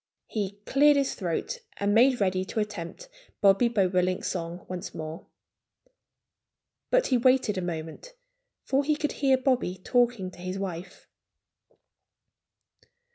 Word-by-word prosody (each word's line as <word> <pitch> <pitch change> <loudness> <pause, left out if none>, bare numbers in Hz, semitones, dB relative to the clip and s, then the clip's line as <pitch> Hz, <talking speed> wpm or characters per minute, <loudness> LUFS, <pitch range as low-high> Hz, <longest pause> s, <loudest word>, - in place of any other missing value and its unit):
He 205 -2 -4
cleared 290 +1 +5
his 275 -1 +1
throat 180 - -3 0.2
and 200 0 +1
made 245 +3 +5
ready 185 -2 +1
to 220 - -3
attempt 210 - -5 0.3
Bobby 200 +4 +5
Bobolink's 185 -4 +1
song 170 -1 -5
once 180 -1 -6
more. 155 +1 -7 1.6
But - - +3
he 255 - +4
waited 255 -4 +3
a 185 - -2
moment, 170 - -6 0.5
for 275 +1 +1
he 300 +1 +1
could 295 0 -2
hear 270 -2 +2
Bobby 255 -8 0
talking 235 -2 +1
to - - -16
his 185 +2 -4
wife. 185 -2 -6
200 Hz, 130 wpm, -27 LUFS, 180-260 Hz, 1.6 s, cleared